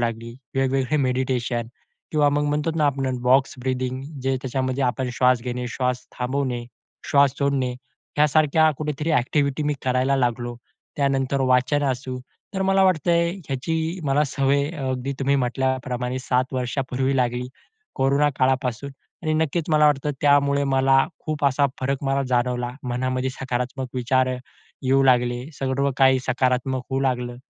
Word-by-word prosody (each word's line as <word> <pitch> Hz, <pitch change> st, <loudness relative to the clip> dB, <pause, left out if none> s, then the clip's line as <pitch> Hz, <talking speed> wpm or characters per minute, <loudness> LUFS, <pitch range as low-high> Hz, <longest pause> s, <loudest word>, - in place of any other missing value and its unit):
लागली, 115 Hz, 0 st, -3 dB, 0.2 s
वेगवेगळे 135 Hz, +2 st, +1 dB
मेडिटेशन 125 Hz, -3 st, 0 dB, 0.5 s
किंवा 150 Hz, -1 st, +4 dB
मग 145 Hz, +1 st, +1 dB
म्हणतोत 150 Hz, +2 st, -1 dB
ना 150 Hz, -2 st, +3 dB
आपण 135 Hz, -2 st, -1 dB
बॉक्स-ब्रीदिंग 130 Hz, 0 st, +1 dB, 0.2 s
जे 135 Hz, 0 st, +1 dB
त्याच्यामध्ये 130 Hz, +1 st, -1 dB
आपण 125 Hz, +1 st, -1 dB
श्वास 125 Hz, 0 st, +3 dB
घेणे, 125 Hz, 0 st, -3 dB
श्वास 125 Hz, +1 st, -2 dB
थांबवणे, 125 Hz, -1 st, -2 dB, 0.5 s
श्वास 140 Hz, -1 st, +4 dB
सोडणे 135 Hz, -3 st, 0 dB, 0.4 s
यासारख्या 155 Hz, +1 st, +4 dB
कुठेतरी 150 Hz, +1 st, -2 dB
एक्टिव्हिटी 140 Hz, +3 st, 0 dB
मी 150 Hz, 0 st, 0 dB
करायला 130 Hz, +2 st, +2 dB
लागलो. 120 Hz, -1 st, -1 dB, 0.4 s
त्यानंतर 140 Hz, -1 st, +1 dB
वाचन 130 Hz, +2 st, +2 dB
असू. 130 Hz, 0 st, -4 dB, 0.4 s
तर 190 Hz, -, 0 dB
मला 195 Hz, 0 st, +3 dB
वाटतंय, 170 Hz, -1 st, +2 dB, 0.2 s
याची 160 Hz, +6 st, -2 dB
मला 145 Hz, +2 st, +2 dB
सवय 140 Hz, +1 st, +1 dB
अ, 160 Hz, -5 st, -7 dB
अगदी 130 Hz, +1 st, -2 dB
तुम्ही 140 Hz, +1 st, +2 dB
म्हंटल्याप्रमाणे 130 Hz, 0 st, -1 dB
7 130 Hz, 0 st, 0 dB
वर्षापूर्वी 130 Hz, +1 st, -1 dB
लागली. 125 Hz, 0 st, 0 dB, 0.5 s
कोरोना 140 Hz, +2 st, +2 dB
काळापासून 130 Hz, 0 st, 0 dB, 0.3 s
आणि 155 Hz, -2 st, 0 dB
नक्कीच 160 Hz, +1 st, 0 dB
मला 150 Hz, -1 st, +5 dB
वाटतं, 150 Hz, 0 st, +1 dB
त्यामुळे 140 Hz, 0 st, +3 dB
मला 135 Hz, 0 st, +3 dB, 0.3 s
खूप 155 Hz, -1 st, -2 dB
असा 140 Hz, +1 st, +3 dB
फरक 135 Hz, +2 st, -1 dB
मला 135 Hz, 0 st, +1 dB
जाणवला, 125 Hz, 0 st, 0 dB, 0.2 s
मनामध्ये 130 Hz, +1 st, -1 dB
सकारात्मक 130 Hz, 0 st, -3 dB
विचार 130 Hz, +1 st, +1 dB, 0.5 s
येऊ 135 Hz, +1 st, +3 dB
लागले. 125 Hz, -1 st, +2 dB
सर्व 135 Hz, +1 st, 0 dB
काही 130 Hz, -1 st, +5 dB
सकारात्मक 130 Hz, 0 st, 0 dB
होऊ 135 Hz, 0 st, 0 dB
लागलं. 125 Hz, -2 st, -1 dB
130 Hz, 135 wpm, -23 LUFS, 125-140 Hz, 0.5 s, मला